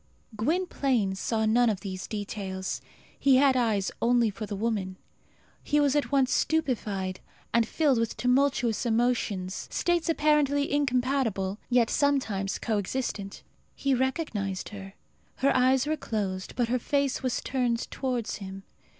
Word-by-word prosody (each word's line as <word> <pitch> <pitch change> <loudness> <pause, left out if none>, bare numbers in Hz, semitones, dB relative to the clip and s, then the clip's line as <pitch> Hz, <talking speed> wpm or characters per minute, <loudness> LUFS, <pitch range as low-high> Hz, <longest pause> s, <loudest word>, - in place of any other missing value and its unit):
Gwynplaine 265 - 0
saw 220 +3 -1
none 235 +2 +4
of 205 -3 -2
these 190 -2 -5
details. 195 -3 -4 0.4
He 275 -2 +5
had 270 0 +5
eyes 220 -6 +1
only 235 -2 +3
for 215 +1 -6
the 205 - -4
woman. 200 -3 -2 0.7
He 295 - +2
was 290 -1 +3
at 290 - 0
once 270 -2 +3
stupefied 210 -12 0 0.3
and 230 -1 +3
filled 285 -5 +2
with 230 -1 -1
tumultuous 250 -3 +2
emotions, 225 -5 0
states 345 -1 0
apparently 295 -3 +2
incompatible, 250 -8 0
yet 245 -2 +3
sometimes 225 -9 +1
co 220 -3 -1
existent. 200 -2 -4 0.3
He 275 -1 0
recognized 245 - -1
her. 195 -1 -9 0.4
Her 275 +1 +2
eyes 260 +1 +4
were 310 +1 0
closed, 195 -7 -3
but 245 -2 +1
her 250 +1 +1
face 280 +1 0
was 255 -2 -1
turned 245 -3 0
towards 250 -4 -2
him. 195 -1 -8
240 Hz, 140 wpm, -28 LUFS, 205-270 Hz, 0.7 s, He